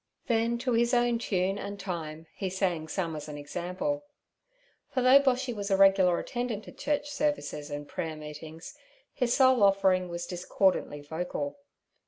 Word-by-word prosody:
Then 230 Hz, -1 st, +1 dB
to 255 Hz, -, +2 dB
his 235 Hz, +2 st, +3 dB
own 240 Hz, -1 st, +2 dB
tune 195 Hz, -3 st, 0 dB
and 200 Hz, 0 st, -6 dB
time 165 Hz, -4 st, -5 dB
he 190 Hz, -, -3 dB
sang 180 Hz, -4 st, -1 dB
some 165 Hz, -1 st, -2 dB
as 150 Hz, -, -6 dB
an 150 Hz, -, -6 dB
example. 180 Hz, -, -3 dB, 0.9 s
For 255 Hz, -, 0 dB
though 260 Hz, +2 st, +8 dB
Boshy 260 Hz, -2 st, +1 dB
was 205 Hz, -2 st, -4 dB
a 195 Hz, -, +3 dB
regular 195 Hz, -2 st, +5 dB
attendant 240 Hz, -4 st, -3 dB
at -, -, -12 dB
church 290 Hz, 0 st, -1 dB
services 285 Hz, -, -2 dB
and 145 Hz, 0 st, -5 dB
prayer 160 Hz, +1 st, -4 dB
meetings, 155 Hz, +2 st, -9 dB, 0.4 s
his 245 Hz, -2 st, +1 dB
sole 260 Hz, -3 st, +5 dB
offering 195 Hz, -2 st, +4 dB
was 170 Hz, 0 st, -4 dB
discordantly 180 Hz, -4 st, 0 dB
vocal. 145 Hz, -2 st, -4 dB
195 Hz, 160 wpm, -29 LUFS, 165-240 Hz, 0.9 s, though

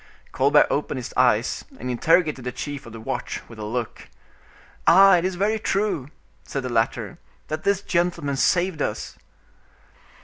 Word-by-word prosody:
Colbert 140 Hz, +3 st, +4 dB
opened 145 Hz, -1 st, -1 dB
his 125 Hz, -, -6 dB
eyes -, -, +2 dB, 0.2 s
and 125 Hz, +2 st, -3 dB
interrogated 155 Hz, +2 st, +2 dB
the 125 Hz, -, -3 dB
chief 140 Hz, +1 st, -6 dB
of -, -, -10 dB
the 115 Hz, -, -8 dB
watch 110 Hz, -, -4 dB
with 115 Hz, -2 st, -13 dB
a -, -, -5 dB
look—"Ah! 125 Hz, -, +1 dB
it 170 Hz, -, -1 dB
is 185 Hz, -1 st, -1 dB
very 210 Hz, +4 st, 0 dB
true," 195 Hz, -10 st, -1 dB, 0.3 s
said 135 Hz, -, -4 dB
the 130 Hz, -, -3 dB
latter, 115 Hz, -2 st, -1 dB, 0.3 s
"that 155 Hz, -, -4 dB
this 200 Hz, 0 st, +1 dB
gentleman 170 Hz, -5 st, 0 dB
saved 175 Hz, +2 st, +1 dB
us." 105 Hz, -, -4 dB
145 Hz, 150 wpm, -23 LUFS, 125-180 Hz, 0.3 s, Colbert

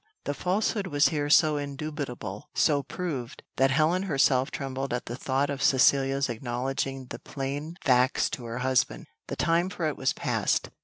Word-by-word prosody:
The 145 Hz, -, -2 dB
falsehood 195 Hz, +5 st, 0 dB
was 145 Hz, -3 st, +3 dB
here 145 Hz, -3 st, -1 dB
so 155 Hz, 0 st, +5 dB
indubitable, 140 Hz, -8 st, -5 dB
so 145 Hz, -3 st, +3 dB
proved, 140 Hz, -5 st, -5 dB
that 135 Hz, +1 st, +4 dB
Helen 155 Hz, +6 st, +2 dB
herself 135 Hz, -7 st, +2 dB
trembled 135 Hz, -1 st, -4 dB
at 125 Hz, -, -4 dB
the 120 Hz, -, -5 dB
thought 135 Hz, +2 st, 0 dB
of 140 Hz, -1 st, -4 dB
Cecilia's 135 Hz, 0 st, +4 dB
acknowledging 130 Hz, +2 st, -3 dB
the 115 Hz, -, -6 dB
plain 145 Hz, +4 st, -5 dB
facts 125 Hz, -1 st, +3 dB
to 125 Hz, -, -5 dB
her 115 Hz, +1 st, -5 dB
husband. 130 Hz, -1 st, +1 dB, 0.2 s
The -, -, -4 dB
time 170 Hz, +2 st, +2 dB
for 180 Hz, -3 st, -3 dB
it 155 Hz, -, -1 dB
was 135 Hz, -, +1 dB
past. -, -, 0 dB
135 Hz, 165 wpm, -27 LUFS, 130-155 Hz, 0.2 s, so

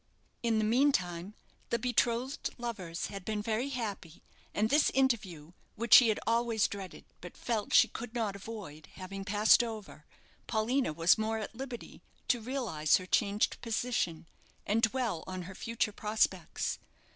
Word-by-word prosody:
In 230 Hz, -2 st, +1 dB
the 215 Hz, -, +2 dB
meantime, 210 Hz, -7 st, +1 dB, 0.3 s
the 235 Hz, -, +1 dB
betrothed 245 Hz, +2 st, 0 dB
lovers 195 Hz, -9 st, -4 dB
had 195 Hz, -1 st, -6 dB
been 210 Hz, +1 st, -3 dB
very 225 Hz, +5 st, -1 dB
happy 205 Hz, -, -5 dB, 0.3 s
and 215 Hz, +2 st, 0 dB
this 295 Hz, +1 st, +5 dB
interview, 200 Hz, -, 0 dB, 0.2 s
which 235 Hz, +2 st, +1 dB
she 245 Hz, -4 st, +10 dB
had 215 Hz, -, +1 dB
always 230 Hz, -1 st, +2 dB
dreaded 195 Hz, -2 st, -8 dB, 0.2 s
but 180 Hz, -, -10 dB
felt 220 Hz, -4 st, -2 dB
she -, -, +7 dB
could 235 Hz, 0 st, -8 dB
not 215 Hz, -4 st, -1 dB
avoid, 195 Hz, -7 st, -9 dB
having 195 Hz, +1 st, -7 dB
passed 205 Hz, +4 st, +5 dB
over, 215 Hz, -9 st, -8 dB, 0.4 s
Paulina 235 Hz, -, +1 dB
was 165 Hz, +6 st, +4 dB
more 220 Hz, +1 st, 0 dB
at 215 Hz, +1 st, -5 dB
liberty 250 Hz, 0 st, -8 dB, 0.3 s
to 240 Hz, -2 st, +2 dB
realize 220 Hz, -, +1 dB
her 185 Hz, -, -7 dB
changed 205 Hz, +2 st, +1 dB
position, 220 Hz, -8 st, -2 dB, 0.4 s
and 215 Hz, +3 st, +1 dB
dwell 225 Hz, -6 st, 0 dB
on 185 Hz, -1 st, -5 dB
her 190 Hz, +2 st, -9 dB
future 225 Hz, +1 st, -2 dB
prospects. 215 Hz, +1 st, -1 dB
220 Hz, 150 wpm, -31 LUFS, 190-235 Hz, 0.4 s, she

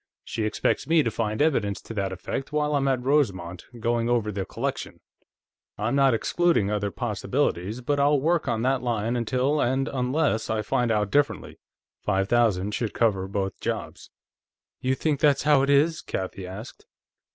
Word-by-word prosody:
She 110 Hz, -2 st, -3 dB
expects 110 Hz, -, 0 dB
me 160 Hz, -1 st, +4 dB
to 115 Hz, -, -1 dB
find 110 Hz, +3 st, 0 dB
evidence 105 Hz, -10 st, +1 dB
to -, -, -8 dB
that 100 Hz, -3 st, -2 dB
effect 115 Hz, +9 st, -5 dB
while 150 Hz, 0 st, 0 dB
I'm 140 Hz, -1 st, +1 dB
at 130 Hz, -2 st, +1 dB
Rosemont, 95 Hz, -, 0 dB
going 120 Hz, +1 st, 0 dB
over 115 Hz, -3 st, +1 dB
the 95 Hz, -1 st, -3 dB
collection. -, -, -4 dB, 0.8 s
I'm 110 Hz, +5 st, -1 dB
not 135 Hz, -3 st, +4 dB
excluding 165 Hz, -, +1 dB
other 105 Hz, -1 st, -1 dB
possibilities, 100 Hz, +3 st, -2 dB
but 145 Hz, +3 st, 0 dB
I'll 145 Hz, 0 st, +4 dB
work 165 Hz, +3 st, +1 dB
on 115 Hz, -2 st, 0 dB
that 130 Hz, 0 st, +1 dB
line 115 Hz, -1 st, -1 dB
until 130 Hz, +5 st, +1 dB
and 130 Hz, +2 st, +1 dB
unless 130 Hz, -2 st, 0 dB
I 110 Hz, -1 st, 0 dB
find 120 Hz, +3 st, 0 dB
out 105 Hz, -3 st, +1 dB
differently. 145 Hz, +3 st, 0 dB, 0.4 s
Five 95 Hz, +1 st, 0 dB
thousand 105 Hz, -4 st, +2 dB
should 115 Hz, -1 st, -2 dB
cover 100 Hz, -5 st, +1 dB
both 95 Hz, -1 st, -3 dB
jobs." -, -, -4 dB, 0.7 s
"You 130 Hz, +1 st, 0 dB
think 145 Hz, +1 st, 0 dB
that's 145 Hz, -3 st, +3 dB
how 145 Hz, -2 st, +5 dB
it 140 Hz, -, 0 dB
is?" 150 Hz, +3 st, +3 dB
Kathie 95 Hz, 0 st, -5 dB
asked. 100 Hz, +6 st, -10 dB
120 Hz, 170 wpm, -25 LUFS, 105-140 Hz, 0.8 s, how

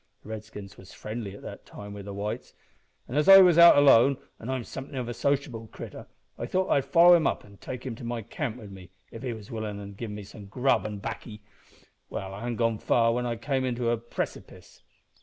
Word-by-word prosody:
The -, -, -13 dB
Redskins 105 Hz, -2 st, -9 dB
was 95 Hz, -, -14 dB
friendly 105 Hz, -2 st, -6 dB
at -, -, -13 dB
that -, -, -9 dB
time 105 Hz, 0 st, -10 dB
wi' 100 Hz, -, -8 dB
the 100 Hz, +1 st, -8 dB
whites, 100 Hz, +2 st, -5 dB, 0.5 s
and 125 Hz, -, -6 dB
as 150 Hz, +4 st, +3 dB
I 195 Hz, -, +12 dB
was 175 Hz, -2 st, +5 dB
out 170 Hz, -3 st, +9 dB
alone, 140 Hz, -1 st, +6 dB, 0.2 s
an' 115 Hz, -, -7 dB
am 130 Hz, -2 st, -2 dB
somethin' 135 Hz, +4 st, -8 dB
of 125 Hz, -2 st, -3 dB
a 120 Hz, -, -4 dB
sociable 135 Hz, -5 st, -1 dB
critter, -, -, -10 dB, 0.3 s
I -, -, -3 dB
thought 185 Hz, 0 st, 0 dB
I'd 140 Hz, -2 st, +3 dB
follow 170 Hz, +5 st, +7 dB
him 165 Hz, -5 st, +4 dB
up -, -, -2 dB
an' 100 Hz, -1 st, -16 dB
take 125 Hz, +4 st, -7 dB
him 130 Hz, -, -3 dB
to -, -, -10 dB
my 120 Hz, -1 st, -4 dB
camp 115 Hz, +2 st, -4 dB
wi' 115 Hz, -, -11 dB
me, 95 Hz, -3 st, -11 dB, 0.2 s
if 115 Hz, -, -9 dB
he 130 Hz, -2 st, -3 dB
was 110 Hz, -2 st, -11 dB
willin', 110 Hz, -3 st, -4 dB
an' 100 Hz, 0 st, -8 dB
give 110 Hz, +3 st, -6 dB
him 105 Hz, 0 st, -7 dB
some 100 Hz, +1 st, -12 dB
grub 125 Hz, +2 st, +1 dB
an' 105 Hz, -1 st, -6 dB
baccy. 105 Hz, +1 st, -7 dB, 0.7 s
Well, 95 Hz, 0 st, -5 dB
I 100 Hz, -, -7 dB
hadn't 120 Hz, +1 st, -3 dB
gone 115 Hz, -1 st, 0 dB
far 115 Hz, -1 st, +2 dB
when 125 Hz, +1 st, -1 dB
I 120 Hz, -, -2 dB
came 130 Hz, +3 st, -1 dB
to 120 Hz, -1 st, 0 dB
a 120 Hz, -, +1 dB
precipiece. 120 Hz, +1 st, -7 dB
115 Hz, 230 wpm, -27 LUFS, 105-130 Hz, 0.7 s, I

